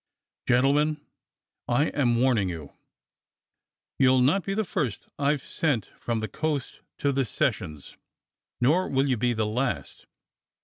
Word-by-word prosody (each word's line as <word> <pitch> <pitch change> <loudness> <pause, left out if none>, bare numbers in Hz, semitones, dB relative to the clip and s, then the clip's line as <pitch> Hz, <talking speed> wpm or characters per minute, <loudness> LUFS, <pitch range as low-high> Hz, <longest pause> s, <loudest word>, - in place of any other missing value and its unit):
Gentlemen, 145 +5 +3 0.7
I 145 +6 +2
am 125 -5 +1
warning 120 -7 +2
you. 80 -5 -7 1.3
You'll 130 -1 +5
not 150 +10 +3
be 195 - -2
the 220 - +1
first 145 - -3
I've 145 -1 +1
sent 145 -10 -1
from 115 -2 -2
the 110 - -2
coast 150 -2 -3 0.2
to 140 - +1
the 135 0 +1
sessions, 75 - -2 0.6
nor 155 +10 +3
will 135 +1 +2
you 130 - +2
be 120 +2 +1
the 110 -1 0
last. 105 - -3
130 Hz, 135 wpm, -26 LUFS, 115-145 Hz, 1.3 s, You'll